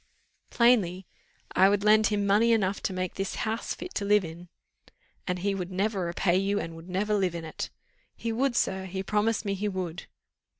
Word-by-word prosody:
"Plainly, 200 -7 +3 0.5
I 190 +1 +6
would 205 0 +1
lend 215 0 +5
him 205 -1 0
money 215 +4 +4
enough 200 -3 +1
to - - -1
make 185 -1 -3
this 195 0 -3
house 220 +1 -2
fit 365 +1 -8
to - - -2
live 205 -1 +3
in." 170 +2 -10 0.8
"And 180 -1 0
he 195 +2 -1
would 185 -1 -4
never 195 0 0
repay 175 +1 +1
you, 200 +1 +1
and 165 -3 -5
would 165 +2 -11
never 200 +4 0
live 190 -4 +1
in 165 -1 -5
it." 155 - -5 0.5
"He 230 - -3
would, 250 +2 0
sir 190 -3 0
he 190 +1 -4
promised 210 +2 0
me 200 - 0
he 200 +2 -2
would." 180 -3 -5
195 Hz, 200 wpm, -28 LUFS, 180-210 Hz, 0.8 s, I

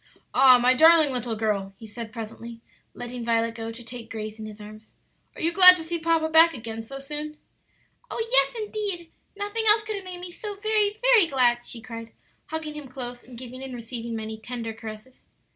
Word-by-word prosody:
"Ah, 260 -1 +7
my 250 +1 +4
darling 320 +1 +6
little 245 -3 -2
girl," 205 -3 -2
he 225 - -11
said 220 +1 -8
presently, 230 0 -8 0.4
letting 245 0 -6
Violet 230 0 +1
go 225 0 -6
to 235 +1 -11
take 235 -1 -9
Grace 215 0 -6
in 215 - -6
his 215 0 -11
arms. 215 +1 -13 0.4
"Are - - -9
you 335 +1 +1
glad 365 0 +10
to 325 - -5
see 340 +1 -3
papa 325 -1 +1
back 325 0 +5
again 225 -2 -6
so 270 +5 -9
soon?" 300 +2 -6 0.7
"Oh, 455 -1 -3
yes, - - +4
indeed; 410 -6 -4 0.3
nothing 410 +2 -3
else 430 +1 +5
could 430 -1 -4
have 390 - -8
made 365 -1 -7
me 355 0 -8
so 415 +3 -7
very, 425 0 0
very 485 -8 +6
glad!" 240 -4 +2
she 230 - -8
cried, 230 0 -9 0.3
hugging 315 -1 -5
him 300 -2 -8
close, 245 -1 -7
and 245 -1 -13
giving 255 +1 -9
and 265 -2 -6
receiving 235 0 -6
many 220 0 -6
tender 230 -1 -5
caresses. 220 +3 -11
255 Hz, 200 wpm, -25 LUFS, 230-335 Hz, 0.7 s, glad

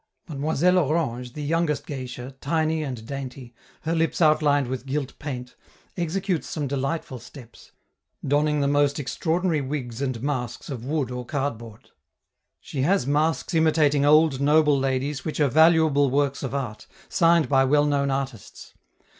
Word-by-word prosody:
Mademoiselle 160 +4 +1
Orange, 130 -6 -1
the 150 - -6
youngest 150 -2 0
geisha, 130 -1 -7
tiny 160 +1 0
and 125 -7 -5
dainty, 130 -2 -7 0.3
her 160 - -2
lips 165 0 0
outlined 150 -3 +3
with 130 +2 -5
gilt 140 0 -2
paint, 125 -4 -6 0.4
executes 180 0 -2
some 150 -3 -3
delightful 135 0 -3
steps, 125 0 -14 0.6
donning 150 +1 +2
the 140 - +1
most 145 +1 +2
extraordinary 160 +3 -1
wigs 130 -3 -5
and 130 -4 -3
masks 125 -3 -3
of 120 -4 -6
wood 140 -2 -2
or 125 0 -4
cardboard. 115 -5 -5 0.7
She 135 - -5
has 180 0 +2
masks 150 +4 0
imitating 155 -3 +3
old, 150 -2 +4
noble 150 0 +4
ladies 135 +1 -1
which 155 - -4
are 145 -2 +3
valuable 160 -1 +4
works 140 +1 0
of 135 0 -4
art, 125 -6 -5 0.2
signed 165 -3 +3
by 135 -1 +4
well 145 +2 +3
known 140 -1 +1
artists. 135 -5 -5
145 Hz, 145 wpm, -24 LUFS, 130-155 Hz, 0.7 s, old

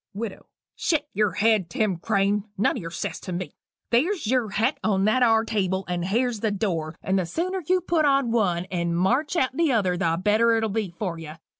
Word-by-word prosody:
WIDOW. 215 -1 -6 0.3
"Shet 310 -3 0
yer 210 -2 +1
head, 210 -3 +2
Tim 195 0 0
Crane 200 +2 0
nun 200 - +2
o' 240 - -4
yer 165 - -6
sass 165 +1 -4
to 185 - -7
me. 180 +1 -4 0.4
There's 315 - +1
yer 240 -1 +1
hat 210 +3 0
on 195 -2 +2
that 215 +4 +2
are 225 -2 +4
table, 190 -3 -1
and 175 -1 -2
here's 230 +3 0
the 220 - 0
door 175 -7 -2
and 190 0 +1
the 185 - -1
sooner 365 - -2
you 370 0 +3
put 335 -2 +1
on 275 -4 +2
one 180 -7 +1
and 170 -2 -1
march 255 - +1
out 265 -6 +1
o' 330 +4 +2
t'other, 200 -9 +1
the 165 -1 +1
better 220 +4 +3
it'll 225 -1 0
be 210 -1 -2
for 180 -6 -3
you. 155 -2 -8
210 Hz, 210 wpm, -25 LUFS, 185-240 Hz, 0.4 s, are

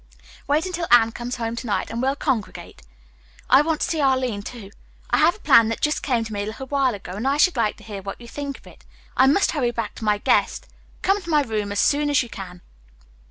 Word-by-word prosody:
Wait 300 +4 +1
until 350 -2 -3
Anne 230 -2 +6
comes 240 +2 -5
home 230 -1 -3
to 235 - -6
night 205 - -1
and 230 +1 -3
we'll 270 +1 +1
congregate. 255 -9 -3 0.7
I 265 - +8
want 315 0 -1
to - - +1
see 325 -3 -1
Arline, 260 -6 +1
too. 205 -2 -9 0.4
I - - +3
have 345 - +4
a - - -17
plan 230 -1 +6
that 230 - -3
just 300 0 0
came 245 -5 0
to 220 -1 -7
me 205 - -2
a - - -3
little 225 +5 -6
while 265 -3 +1
ago, 195 - -9
and 210 +7 -3
I 280 +1 +2
should 345 +2 +4
like 225 -4 0
to - - -16
hear 205 -3 -7
what 195 +1 -7
you 235 - -12
think 280 +2 -6
of - - -22
it. - - -16 0.3
I 260 - +5
must 300 +9 +3
hurry 275 -6 0
back 230 -3 -4
to - - -8
my 210 -1 +2
guest. - - +1 0.4
Come 395 +1 +2
to 345 - -10
my 300 -2 +3
room 215 -4 -3
as 205 - -2
soon 295 +1 +2
as 285 -3 +3
you 240 - -10
can." 180 -4 -9
245 Hz, 255 wpm, -22 LUFS, 220-290 Hz, 0.7 s, I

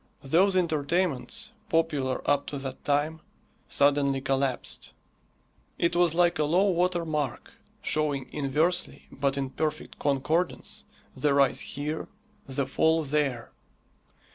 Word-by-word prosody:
Those 185 +8 +3
entertainments, 170 - 0 0.2
popular 150 -6 0
up 145 0 +2
to 145 - -4
that 135 -1 -6
time, 150 +2 0 0.5
suddenly 140 -1 +3
collapsed. 135 -1 -2 0.8
It 170 - +1
was 175 -2 +3
like 175 -1 +3
a - - +4
low 180 +7 +3
water 175 -1 +1
mark, 150 -5 -3 0.3
showing 145 -3 0
inversely, 155 +5 0
but 140 -1 -1
in 135 -1 -2
perfect 155 +1 -3
concordance, 150 +5 -1 0.3
the 145 -2 +2
rise 140 -2 +4
here, 150 +3 -4 0.4
the 135 0 -1
fall 160 +4 +2
there. 140 -5 -1
150 Hz, 115 wpm, -28 LUFS, 140-165 Hz, 0.8 s, a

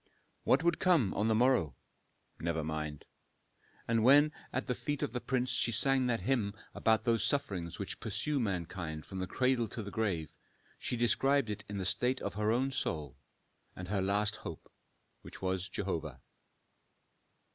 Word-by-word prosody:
What - - +4
would 170 0 +2
come 160 - +3
on 105 - +1
the 110 - +3
morrow? 115 - +3 0.6
Never 80 -1 -1
mind. 75 -1 -4 0.8
And 115 -1 +2
when 145 +5 +7 0.2
at 130 - -2
the 125 - 0
feet 145 +3 -3
of - - -2
the 125 - -2
prince 130 -1 0
she 120 - +2
sang 130 +3 +2
that 115 -2 0
hymn 110 -7 0 0.2
about 110 -1 +2
those 115 -2 +2
sufferings 95 - -1
which 100 -1 -5
pursue 135 +7 -1
mankind 90 -6 -3
from 95 - -6
the 95 - -2
cradle 125 -1 +1
to 110 +2 -6
the 100 - -7
grave, 95 -9 -2 0.4
she 125 - -2
described 135 +1 +3
in - - -1
it - - -11
the 100 -2 -4
state 125 +7 +1
of - - -4
her 105 +1 +1
own 130 +4 +1
soul, 75 - -2 0.6
and 90 0 -7
her 100 -1 0
last 105 +2 +1
hope, - - -9 0.5
which - - -11
was 95 0 -2
Jehovah. 80 -9 -3
110 Hz, 170 wpm, -33 LUFS, 95-130 Hz, 0.8 s, when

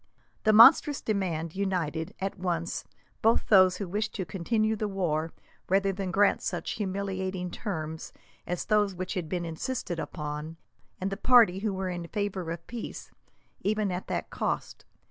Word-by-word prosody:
This 215 - +5
monstrous 270 +5 +8
demand 175 -6 -2
united, 175 -5 -2
at 195 0 -3
once, 170 -2 -2 0.4
both 225 +1 +3
those 185 -3 +6
who 200 - -4
wished 205 +4 -2
to 190 - -2
continue 215 +6 0
the 215 0 -2
war 165 -5 -1 0.4
rather 195 +1 +3
than 190 0 -3
grant 200 +3 +3
such - - -3
humiliating 190 -3 -3
terms 160 -7 -5 0.4
as 180 -1 -2
those 210 -3 +2
which 185 +1 -4
had 175 -6 -3
been 175 0 -2
insisted 175 +1 -3
upon, 150 0 -5 0.4
and 190 +1 -2
the 195 - -3
party 230 -8 +5
who 215 +1 -1
were 190 -1 -3
in 175 -1 -5
favour 200 -4 -3
of 170 0 -5
peace, 235 -2 -7 0.5
even 210 -1 0
at 180 +1 -4
that - - -3
cost. - - -3
190 Hz, 160 wpm, -28 LUFS, 170-205 Hz, 0.5 s, monstrous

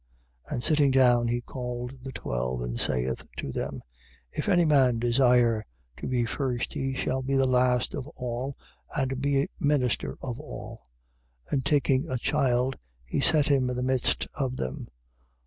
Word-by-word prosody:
9:34. - - -14
And 120 - -3
sitting 150 -3 +4
down, 125 -3 +4
he 120 +1 0
called 125 0 -5
the 135 +1 -6
twelve 60 - -3
and - - -4
saith 65 0 -1
to 70 - -4
them: - - -4 0.5
If - - -3
any 175 -3 +4
man 135 -6 +4
desire 120 -2 +3 0.3
to - - -5
be 125 -2 +1
first, 125 0 -2
he 135 0 -2
shall 130 0 -1
be 135 +1 -1
the 135 0 +4
last 125 -1 +2
of 140 -2 -4
all 125 +2 -4 0.4
and 130 -1 -1
be 140 0 +2
minister 145 -4 +1
of 125 -1 -5
all. 115 - -9 0.6
9:35. - - -3
And 135 -3 +1
taking 140 +1 +2
a 130 - 0
child, 130 -1 +1 0.3
he 65 - -2
set 150 +1 +4
him 135 -3 +3
in 125 - -2
the 125 - -2
midst 130 -1 +1
of 130 -3 -2
them. 65 0 -4
130 Hz, 170 wpm, -27 LUFS, 120-135 Hz, 0.6 s, sitting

